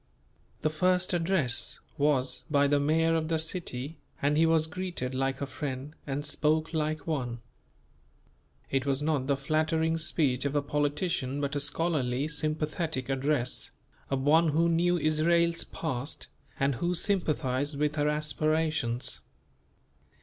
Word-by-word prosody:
The 155 - +2
first 180 +3 +2
address 165 -8 +1 0.2
was 140 -3 +1
by 145 -2 +4
the 145 0 +3
mayor 160 +3 +2
of 160 -1 0
the 165 0 +1
city 160 -3 -4 0.2
and 145 +1 +2
he 165 +2 +4
was 160 -1 +3
greeted 160 -6 -4
like 135 +1 -1
a - - 0
friend 140 +1 -5
and 140 +1 -2
spoke 155 +2 +1
like 155 -1 -1
one. 125 -7 -2 1.3
It 135 0 0
was 140 +1 0
not 150 -4 0
the 140 -1 +2
flattering 160 +3 +1
speech 145 -5 +2
of 140 0 -1
a 145 - +3
politician 145 -1 -1
but 140 0 -2
a - - +1
scholarly, 145 -3 0
sympathetic 155 -2 -1
address, 135 -1 +1 0.4
of 135 -1 0
one 160 +4 +5
who 165 +3 +3
knew 175 +2 +3
Israel's 165 +2 +2
past 140 -3 -4 0.3
and 140 0 +2
who 175 +1 +1
sympathized 145 -7 0
with 150 +1 0
her 150 0 +2
aspirations. 155 -4 0
150 Hz, 140 wpm, -29 LUFS, 140-160 Hz, 1.3 s, one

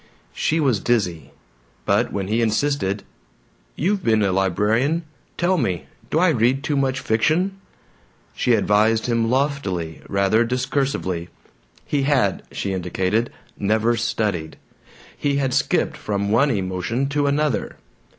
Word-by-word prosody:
She 160 - 0
was 130 -9 +2
dizzy. 95 -8 0 0.6
But - - +2
when 95 -2 -3
he 110 +3 +1
insisted, 110 -3 0 0.7
"You've 195 +5 0
been 110 -2 +3
a 100 - +2
librarian; 105 - +1 0.3
tell 180 +1 +2
me; 90 - -1 0.2
do - - 0
I 180 +2 +4
read 130 -1 +2
too 150 0 -1
much 135 -1 +1
fiction?" 175 - +1 0.7
she - - +2
advised 110 +2 +2
him 115 -2 +1
loftily, 120 - -1
rather 100 +3 +3
discursively. 125 -8 -1 0.6
He 145 - 0
had, 135 -9 +2
she 100 - -3
indicated, 95 +5 -1 0.3
never 110 +3 +2
studied. 105 -8 -2 0.6
He 140 -1 0
had 135 -2 0
skipped - - +1
from 100 -1 -2
one 130 +6 +4
emotion 100 +4 -1
to 145 0 +1
another. 145 0 0
115 Hz, 130 wpm, -22 LUFS, 100-140 Hz, 0.7 s, I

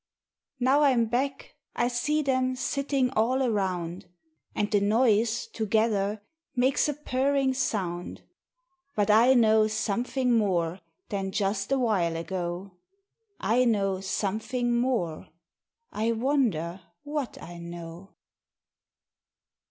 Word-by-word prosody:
Now 265 +4 +3
I'm 255 -5 +4
back, 265 +4 -2 0.2
I 240 - +1
see 295 +5 0
them 260 -1 +1
Sitting 275 -1 0
all 255 +3 +1
around; 185 -6 -2 0.5
And 205 - -1
the 205 -2 +3
noise, 225 +1 +2
together, 215 -1 0 0.3
Makes 260 +4 +2
a 295 - -2
purring 270 -1 +1
sound. 185 -9 -3 0.7
But 210 0 +2
I 235 +5 +6
know 220 -2 +5
Something 240 +4 0
More 185 -5 +1 0.3
Than 195 -1 -2
just 200 +3 -1
awhile 215 -11 +1
ago. 175 +3 -4 0.7
I 225 +6 +2
know 195 -5 +1
Something 220 +5 -1
More! 235 -10 -1 0.6
I 225 +2 0
wonder 220 - 0 0.2
what 290 -3 -4
I 175 0 -9
know. 170 +2 -9
220 Hz, 105 wpm, -27 LUFS, 195-255 Hz, 0.7 s, I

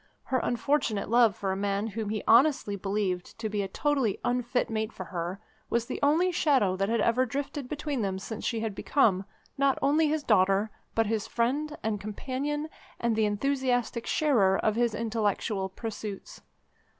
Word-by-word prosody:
Her 260 - 0
unfortunate 240 -5 0
love 230 -4 +5
for 195 -1 -2
a - - -1
man 200 +1 -1
whom 220 -1 -4
he 215 0 -2
honestly 250 -4 +4
believed 195 -2 -2
to 225 -1 -3
be 210 -1 -1
a 195 - -2
totally 265 0 0
unfit 245 0 0
mate 220 -1 -2
for 185 - -7
her 175 +2 -4 0.3
was 235 0 +1
the - - -5
only 320 +6 +3
shadow 265 - +2
that 195 +2 0
had 230 0 +1
ever 240 +2 +3
drifted 275 +1 -4
between 295 -3 -2
them 195 -2 -1
since 215 +3 -6
she 230 -2 -1
had 220 -2 -2
become, 200 -4 +2 0.3
not 275 -1 +3
only 300 +3 +3
his 305 0 0
daughter, 200 -1 +3 0.2
but 225 - +3
his 220 -1 -1
friend 290 +6 -1
and 215 -2 -1
companion, 275 +8 -3 0.3
and 235 -1 +1
the 220 0 +2
enthusiastic 245 +1 0
sharer 220 -11 +3
of 215 - +1
his 235 -1 +1
intellectual 215 -3 -1
pursuits. 210 0 -7
225 Hz, 175 wpm, -28 LUFS, 205-265 Hz, 0.3 s, love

